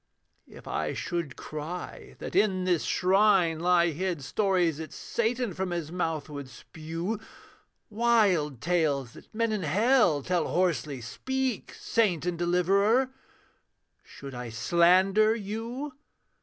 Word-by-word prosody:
'If - - -14
I - - -2
should 170 -6 -3
cry 155 +4 -7
that - - -7
in 190 -2 +2
this 180 -3 +1
shrine 185 -3 +3
lie 175 0 +3
hid 170 -1 -3
Stories 180 -4 +1
that 160 - -7
Satan 235 -2 -2
from 190 +2 -3
his 170 -3 -4
mouth 165 -4 -2
would 140 -3 -7
spew; 165 - -5 0.7
Wild 205 - +2
tales 150 -8 0
that - - -15
men 230 0 0
in 210 -2 -1
hell 185 - +3
tell 180 +2 0
hoarsely 160 -7 0
speak! 260 - -3
Saint 190 -8 0
and 180 -1 -1
Deliverer! 200 +9 +2 0.9
Should 140 -1 -11
I 125 -1 -6
slander 185 - +4
you?' 230 +7 -5
180 Hz, 125 wpm, -28 LUFS, 160-210 Hz, 0.9 s, slander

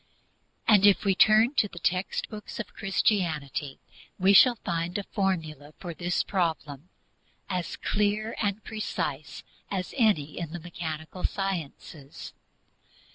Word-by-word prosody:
And 210 -3 +6
if 200 +1 +4
we 195 - +4
turn 220 +6 +5
to 210 - +4
the 185 - -14
text 180 +2 -1
books 215 0 -8
of 235 - -6
Christianity 160 -9 -1 0.4
we 190 +2 +4
shall 245 +5 +8
find 170 +1 -1
a 205 - -3
formula 160 -8 -3
for 175 -3 -6
this 175 +2 -1
problem 160 -4 -2 0.6
as 180 -2 -2
clear 210 +2 0
and 205 0 -1
precise 155 -9 -4 0.3
as 185 -2 -3
any 200 - +2
in 165 -2 -5
the 175 - -4
mechanical 160 0 -6
sciences. 165 -6 -4
180 Hz, 130 wpm, -27 LUFS, 155-205 Hz, 0.6 s, shall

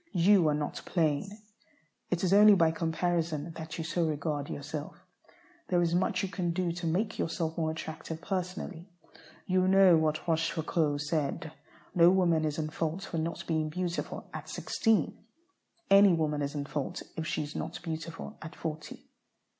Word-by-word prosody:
You 180 -1 +5
are 150 - +2
not 150 0 -3
plain. 160 +1 0 0.8
It 180 0 -1
is 185 0 +3
only 210 0 +8
by 165 -3 +4
comparison 165 -1 -1
that 160 -1 -7
you 165 - -3
so 165 +2 0
regard 150 -2 -2
yourself. 145 +1 -6 0.7
There 180 - +2
is 170 0 +1
much 185 +1 +1
you 195 - -2
can 175 -3 -2
do 180 -1 0
to 170 0 -4
make 205 +7 -1
yourself 165 -1 -1
more 160 -2 0
attractive 160 0 -6
personally. 185 -1 -4 0.6
You 185 0 +2
know 190 -2 +7
what 155 +1 0
Rochefoucauld 160 -2 0
said: 150 +1 -2 0.4
"No 170 -2 +7
woman 175 -4 +3
is 150 -1 -2
in 155 -1 -2
fault 165 +4 -2
for 170 -4 -3
not 165 +1 -3
being 155 -2 0
beautiful 175 +2 -3
at - - -7
sixteen; 220 - 0 0.7
any 200 -1 +8
woman 150 -3 0
is 145 +1 -3
in 145 -1 -2
fault 145 -2 -4
if 160 -1 -3
she 160 - -1
is 145 +1 -8
not - - -4
beautiful 165 0 -6
at 160 - -8
forty." 155 -1 -6
165 Hz, 165 wpm, -30 LUFS, 155-180 Hz, 0.8 s, only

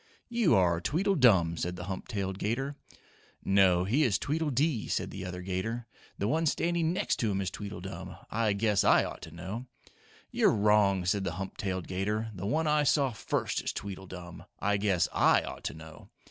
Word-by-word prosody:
"You 235 - +3
are 85 -3 +3
Tweedledum," 125 - +3
said 90 +2 -2
the 90 - -6
hump 95 +1 -5
tailed 95 -4 -3
'gator. 135 +7 -2 0.7
"No, 95 -2 +4
he 115 +11 +1
is 105 -8 +2
Tweedledee," 150 -3 0
said - - -2
the - - -6
other 90 -1 -6
'gator. 95 +6 -3 0.3
"The 100 - -1
one 160 +7 +1
standing 170 +1 +1
next 180 - 0
to 115 - 0
him 100 -1 0
is 95 -2 -2
Tweedledum. 100 -1 -7 0.2
I 110 -2 +1
guess 105 -1 +2
I - - +5
ought - - -6
to 80 - -9
know!" 95 +9 -6 0.6
"You're - - +3
wrong," 100 -3 +3
said 95 +2 +1
the 90 -3 -2
hump 95 +2 -5
tailed 95 -6 -3
'gator. 105 +4 -2
"The 95 0 -5
one 160 +9 +1
I 150 0 +3
saw 140 -2 +3
first 110 - -2
is - - -1
Tweedledum. 90 -3 -8
I 105 0 +1
guess 95 -4 +2
I - - +4
ought - - -8
to - - -3
know!" 80 0 -12
100 Hz, 185 wpm, -30 LUFS, 95-125 Hz, 0.7 s, I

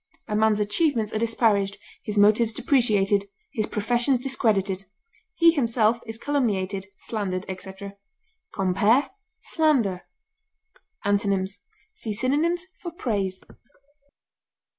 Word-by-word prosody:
A 210 - -2
man's 215 0 +3
achievements 220 +1 +1
are 215 - 0
disparaged, 220 -3 +1 0.2
his 210 -1 -5
motives 215 +2 +4
depreciated, 205 -9 +2 0.2
his 215 -6 -1
professions 240 +5 +1
discredited; 210 -7 +1 0.5
he 335 -1 +6
himself 235 -6 +1
is 225 0 -6
calumniated, 200 -8 -1
slandered, 195 -4 -3
etc. 190 +1 -7 0.6
Compare 205 +8 +2 0.3
SLANDER. 255 - +1 1.0
Antonyms: 200 -1 0 0.3
See 230 - -4
synonyms 300 - 0 0.2
for 345 - -5
PRAISE. 200 - -2
215 Hz, 95 wpm, -25 LUFS, 200-250 Hz, 1.0 s, he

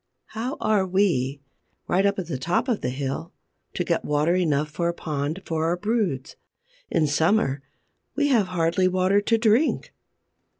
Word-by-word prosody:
How 245 +6 -4
are 210 -3 +2
we, 175 -8 +1 0.5
right 190 +3 +3
up 200 - 0
at 190 - -3
the 150 -6 -4
top 175 - 0
of 235 -5 0
the - - -1
hill, 135 +5 -4 0.4
to - - 0
get - - 0
water 150 +3 +1
enough 150 -5 +1
for 170 +3 -1
a 170 - -3
pond 155 +4 -3
for 160 -1 -1
our 170 +2 +1
broods? 195 - -1 0.5
In 155 - +2
summer, 145 -1 +1 0.5
we 290 0 +2
have 225 -8 +3
hardly 175 +1 +1
water 185 +2 +2
to 225 +2 +2
drink! 225 +6 +2
175 Hz, 165 wpm, -24 LUFS, 150-205 Hz, 0.5 s, right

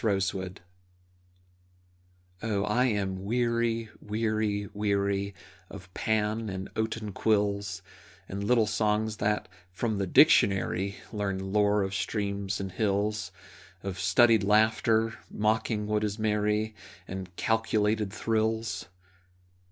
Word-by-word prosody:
Protest 95 -4 +1 2.1
Oh, 105 -3 0
I 115 +5 +2
am 95 -5 -1
weary, 115 0 0
weary, 110 -1 -1
weary 100 -1 0 0.3
Of 90 +1 -11
Pan 110 0 0
and 95 0 -5
oaten 110 -1 -2
quills 100 -2 0 0.4
And 100 +1 -4
little 115 +1 +3
songs 105 0 0
that, 105 0 0 0.2
from 105 +2 -2
the 100 - -1
dictionary, 100 - +4 0.2
Learn 95 -2 -2
lore 105 -1 +3
of 95 0 -3
streams 100 -1 -2
and 95 -1 -4
hills, 105 -1 0 0.5
Of 95 -2 -4
studied 110 +4 +5
laughter, 110 +2 +3
mocking 110 0 0
what 105 0 0
is 105 0 -1
merry, 105 0 0 0.3
And 95 -1 -7
calculated 110 -1 +1
thrills! 110 +1 -1
105 Hz, 105 wpm, -28 LUFS, 100-110 Hz, 2.1 s, studied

